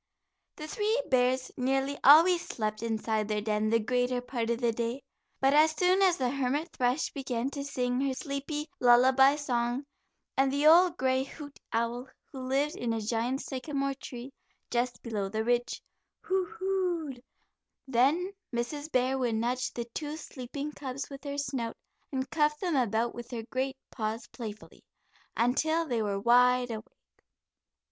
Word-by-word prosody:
The 305 - -7
three 430 +7 0
bears 255 0 +2
nearly 270 +2 0
always 335 +5 +7
slept 215 -1 -3
inside 220 -1 -1
their 210 -1 0
den 215 0 0
the 230 +1 +3
greater 245 +2 0
part 245 -2 -3
of 235 0 0
the 240 -2 +2
day, 235 +3 -3 0.4
but 270 +1 +3
as 310 +1 +5
soon 370 +2 +3
as 370 -3 +4
the 250 -2 0
hermit 280 +4 -1
thrush 250 +4 +1
began 265 -2 -3
to 280 -1 -4
sing 250 -2 -1
her 270 -1 0
sleepy 285 +3 -4
lullaby 260 +3 +6
song, 250 -2 -1 0.5
and 270 0 +3
the 285 +2 0
old 345 +2 +7
gray 260 0 +2
hoot 285 +1 -10
owl, 235 +2 -1 0.2
who 265 - -8
lived 270 +3 0
in 235 -1 -1
a 225 - -1
giant 230 +5 -1
sycamore 275 +1 -2
tree 260 0 -9 0.4
just 245 +1 -1
below 210 -5 -2
the 220 +2 -1
Ridge, 245 +1 0 0.4
"who 375 -1 0 0.2
oo, - - -1 0.5
oo'd," 250 -2 -12 0.7
then 280 +9 +2 0.2
Mrs. 285 +6 -3
Bear 260 +1 +1
would 240 -3 0
nudge 245 +3 -1
the 235 - -4
two 300 0 -4
sleeping 280 0 -6
cubs 275 -1 -6
with 275 +1 -9
her 285 0 -4
snout, 260 -5 -3 0.3
and 260 -1 -2
cuff 300 -1 +2
them 355 -5 -1
about 235 -2 +1
with 240 -1 -8
her 235 -3 -5
great 265 +1 -1
paws 220 -1 -3
playfully, 215 -4 -9 0.5
until 315 +8 +2
they 240 -6 -1
were 200 -2 -1
wide 245 +2 +4
awake. 220 -1 -8
255 Hz, 160 wpm, -29 LUFS, 235-285 Hz, 0.7 s, always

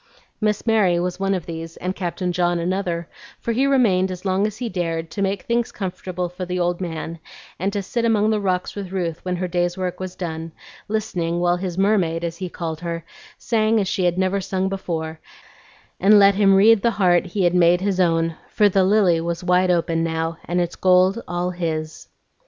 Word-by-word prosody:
Miss 210 -1 0
Mary 205 -6 +3
was 180 +1 -2
one 195 0 +1
of 180 - -4
these, 165 0 -7
and 185 +1 -3
Captain 180 0 -2
John 175 0 +1
another; 175 -1 -2 0.3
for 235 - -2
he 260 +4 +2
remained 210 -9 +3
as 185 +1 -7
long 190 +2 +2
as 215 0 -7
he 245 - -3
dared, 165 -4 -3
to 200 - -4
make 195 0 -1
things 235 0 0
comfortable 185 -2 -4
for 180 +1 -7
the 180 0 -3
old 175 +1 0
man, 165 -1 -5 0.4
and 195 +3 0
to 200 -1 -2
sit 235 +5 -2
among 220 -2 +3
the 215 - +1
rocks 185 -2 -1
with 195 -3 -6
Ruth 175 -4 -3
when 180 -1 -2
her 180 +1 -2
day's 175 0 -1
work 180 -1 -3
was 185 -1 -6
done, 165 -2 -5 0.3
listening 180 -6 -2
while 175 0 +2
his 180 -1 -4
"Mermaid," 190 -5 +1
as 170 0 -3
he 185 -1 -5
called 165 -2 -5
her, 170 -2 -5 0.3
sang 220 -1 +1
as 195 - 0
she 185 0 0
had 175 0 +1
never 190 +1 +1
sung 190 0 -1
before, 160 -4 -4 0.8
and 205 +3 +6
let 200 0 +7
him 195 -1 +4
read 210 +2 +6
the 235 - +3
heart 180 -2 +3
he 190 +2 -1
had 175 0 +3
made 175 0 +4
his 195 -1 0
own, 165 -2 +2
for 210 -1 +3
the 195 0 +3
lily 185 -4 +3
was 170 +2 -3
wide 180 0 +3
open 165 -2 +1
now, 165 0 -2
and 175 +1 -1
its 175 -1 -1
gold 185 +4 +3
all 175 +1 -2
his. 160 -3 -4
180 Hz, 210 wpm, -22 LUFS, 170-195 Hz, 0.8 s, let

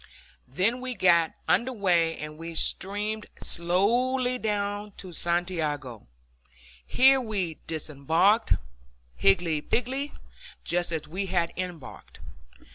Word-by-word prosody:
Then 185 - +1
the - - -10
fleet 255 -2 -5
got 170 -3 +4
under 255 +2 +2
way, 175 -7 +2
and 150 0 -7
we 165 +1 -8
steamed 210 +5 0
slowly 245 +9 +1
down 205 -1 -2
to 185 - -9
Santiago. 160 - -2 0.8
Here 265 - +5
we 195 -9 -3
disembarked, 160 - +2 0.6
higgledy 150 - +2
piggledy, 265 - -2 0.5
just 175 0 0
as 155 -2 -3
we 190 +5 -3
had 175 -2 0
embarked. 180 -6 -7
180 Hz, 110 wpm, -27 LUFS, 165-215 Hz, 0.8 s, Here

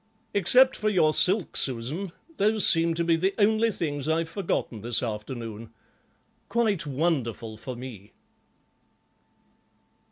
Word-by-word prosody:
Except 250 +7 +5
for 215 - -1
your 165 -6 +3
silk, 190 +2 +2
Susan, 135 +9 -1 0.3
those 215 0 +3
seem 165 0 +4
to 170 - 0
be 165 0 +3
the 190 +4 0
only 220 +1 +3
things 145 -8 -3
I've 165 +1 0
forgotten 165 - -3
this 120 +3 0
afternoon. 115 0 -6 0.8
Quite 215 -9 0
wonderful 130 -7 -2
for 125 +3 -7
me." 120 -5 -10
165 Hz, 120 wpm, -26 LUFS, 120-200 Hz, 0.8 s, Except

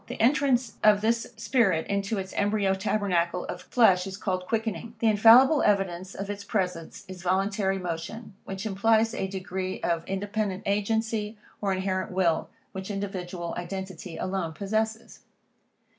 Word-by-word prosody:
The - - -7
entrance 255 -2 +2
of 210 -1 +6
this 230 +1 +1
spirit 220 -7 +2
into 200 +2 -1
its 190 -1 -5
embryo 205 -1 +1
tabernacle 190 -3 0
of 180 - -6
flesh, 190 -6 +3
is 190 0 -6
called 185 -3 -2
quickening. 225 0 -2
The - - -2
infallible 230 +7 +7
evidence 190 -2 0
of 195 - -5
its 205 0 -5
presence 180 -5 -3
is 185 -1 -9
voluntary 195 +2 +1
motion, 180 +5 -5
which 195 +2 -6
implies 220 +2 +2
a 190 - -2
degree 185 -1 -4
of 170 -1 0
independent 200 0 -2
agency, 215 +1 -1 0.2
or 200 -2 0
inherent 185 0 -1
will, 175 -4 +1 0.2
which 190 +1 -6
individual 185 -4 -4
identity 185 -1 -6
alone 185 -4 -2
possesses. 220 +4 -2
195 Hz, 145 wpm, -27 LUFS, 185-220 Hz, 0.2 s, infallible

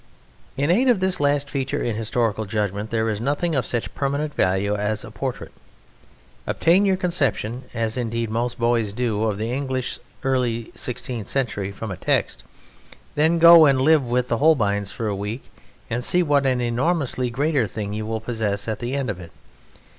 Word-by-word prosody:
In 145 +4 +2
aid 250 +8 +3
of 235 -6 +4
this 190 0 0
last 145 0 +1
feature 140 +1 -2
in 115 - -1
historical 110 -1 -1
judgment 105 0 -2
there 115 0 0
is 110 -1 -2
nothing 145 +6 0
of 135 -5 0
such 120 -2 -3
permanent 145 +2 -2
value 95 +3 +1
as 105 +1 -2
a - - -10
portrait. - - -5 1.0
Obtain 185 +5 +4
your 190 -1 +2
conception 135 - -1
(as, 115 0 -2
indeed, 115 -2 -2
most 120 +2 -1
boys 115 -3 +1
do) 110 -2 -1
of 105 -3 -1
the 110 +3 -3
English 130 -1 -2 0.2
early 125 -4 -1
sixteenth 120 -3 -4
century 105 -7 -1
from 105 +1 -6
a 90 - -5
text, - - 0 0.7
then 160 +3 +3
go 170 -1 +9
and 135 -2 +3
live 155 +2 +4
with 125 0 0
the 115 - -1
Holbeins 105 -10 +2
for 115 -3 -5
a 105 - -1
week 105 +6 -6 0.4
and 120 +2 -2
see 180 +8 +2
what 145 -3 +2
an 130 -1 +1
enormously 125 +1 0
greater 140 0 +1
thing 100 +1 -5
you 110 0 -4
will 110 0 -2
possess 110 -3 -2
at 110 -2 -2
the 120 +3 -3
end 140 -2 -1
of 100 -5 -4
it. 85 -2 -10
120 Hz, 185 wpm, -23 LUFS, 110-140 Hz, 1.0 s, go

